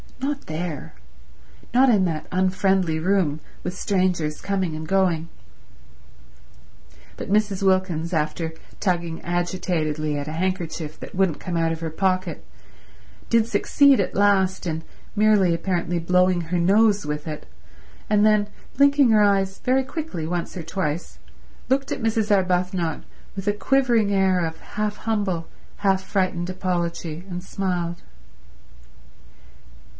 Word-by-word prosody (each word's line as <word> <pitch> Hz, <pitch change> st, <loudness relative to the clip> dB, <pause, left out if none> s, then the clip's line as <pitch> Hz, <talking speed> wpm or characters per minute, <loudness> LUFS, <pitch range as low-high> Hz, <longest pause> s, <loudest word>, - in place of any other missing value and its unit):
Not 280 Hz, +1 st, -2 dB
there. 160 Hz, -, -5 dB, 0.8 s
Not 260 Hz, +1 st, +6 dB
in 205 Hz, -5 st, +4 dB
that 160 Hz, -3 st, -2 dB
unfriendly 185 Hz, -2 st, +1 dB
room, 170 Hz, -4 st, +1 dB, 0.2 s
with 180 Hz, +1 st, -4 dB
strangers 180 Hz, -7 st, 0 dB
coming 190 Hz, -5 st, -1 dB
and 155 Hz, 0 st, -6 dB
going. 175 Hz, -3 st, +1 dB, 1.9 s
But -, -, -6 dB
Mrs. 205 Hz, -2 st, +2 dB
Wilkins, 185 Hz, -3 st, +1 dB
after 160 Hz, +1 st, -1 dB, 0.3 s
tugging 170 Hz, -4 st, -1 dB
agitatedly 170 Hz, -4 st, -1 dB
at 145 Hz, 0 st, -4 dB
a -, -, -4 dB
handkerchief 165 Hz, -3 st, -3 dB
that -, -, -9 dB
wouldn't 185 Hz, -4 st, +1 dB
come 180 Hz, -, -4 dB
out 165 Hz, -1 st, +1 dB
of 165 Hz, 0 st, -4 dB
her 165 Hz, -1 st, -3 dB
pocket, 185 Hz, +1 st, -1 dB, 0.9 s
did 230 Hz, -1 st, +4 dB
succeed 275 Hz, +5 st, +4 dB
at -, -, -1 dB
last 190 Hz, -2 st, +2 dB
in 160 Hz, -1 st, -3 dB, 0.3 s
merely 205 Hz, -4 st, +4 dB
apparently 175 Hz, 0 st, -1 dB
blowing 180 Hz, +1 st, +3 dB
her 170 Hz, +2 st, -2 dB
nose 205 Hz, +3 st, +4 dB
with 150 Hz, +1 st, -4 dB
it, 150 Hz, -1 st, -6 dB, 0.6 s
and 210 Hz, 0 st, +4 dB
then, 210 Hz, -1 st, +4 dB, 0.3 s
blinking 280 Hz, -2 st, +5 dB
her 215 Hz, -1 st, +5 dB
eyes 195 Hz, -1 st, +2 dB
very 260 Hz, +1 st, +2 dB
quickly 270 Hz, -, -5 dB
once 175 Hz, +2 st, -3 dB
or 170 Hz, -, -5 dB
twice, 165 Hz, -2 st, -3 dB, 0.5 s
looked 270 Hz, +1 st, +1 dB
at -, -, -2 dB
Mrs. 220 Hz, -2 st, +2 dB
Arbuthnot 180 Hz, -3 st, 0 dB, 0.3 s
with 195 Hz, +1 st, -6 dB
a 205 Hz, -, +3 dB
quivering 235 Hz, -2 st, +2 dB
air 190 Hz, -2 st, +2 dB
of 160 Hz, 0 st, -5 dB
half 210 Hz, 0 st, -3 dB
humble, 200 Hz, -7 st, -1 dB, 0.3 s
half 195 Hz, -2 st, +1 dB
frightened 185 Hz, -3 st, -1 dB
apology, 175 Hz, -3 st, -3 dB
and 180 Hz, 0 st, -5 dB
smiled. 180 Hz, -3 st, -3 dB
185 Hz, 130 wpm, -23 LUFS, 170-205 Hz, 1.9 s, Not